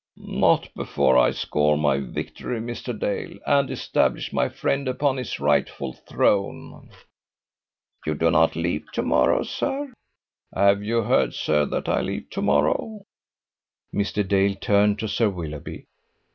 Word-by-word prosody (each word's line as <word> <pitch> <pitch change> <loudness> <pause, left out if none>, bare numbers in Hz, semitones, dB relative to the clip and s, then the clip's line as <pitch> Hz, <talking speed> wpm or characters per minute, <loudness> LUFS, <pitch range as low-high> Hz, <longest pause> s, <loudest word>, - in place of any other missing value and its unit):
"Not - - +1
before 65 - +1
I 65 - +5
score 75 0 +1
my 70 -2 +2
victory, 70 - -5
Mr. 120 0 -5
Dale, 100 - -3
and 140 -2 +3
establish - - 0
my - - +1
friend 135 0 -1
upon 135 +1 0
his 125 -3 -4
rightful 65 - 0
throne." 100 +9 -1 1.2
"You 75 - 0
do 80 +2 +2
not 80 +1 +3
leave 85 -1 -2
to - - -1
morrow, 65 0 +3
sir?" 275 -1 -3 0.6
"Have 100 +1 +4
you 115 +2 0
heard, - - +2
sir, 75 -1 +1
that - - -3
I - - +1
leave - - -5
to - - -3
morrow?" 195 - +1 0.9
Mr. 100 0 -1
Dale 100 0 +2
turned 100 +1 +2
to 110 - -3
Sir 110 +1 +1
Willoughby. 80 -6 -7
100 Hz, 140 wpm, -24 LUFS, 75-120 Hz, 1.2 s, I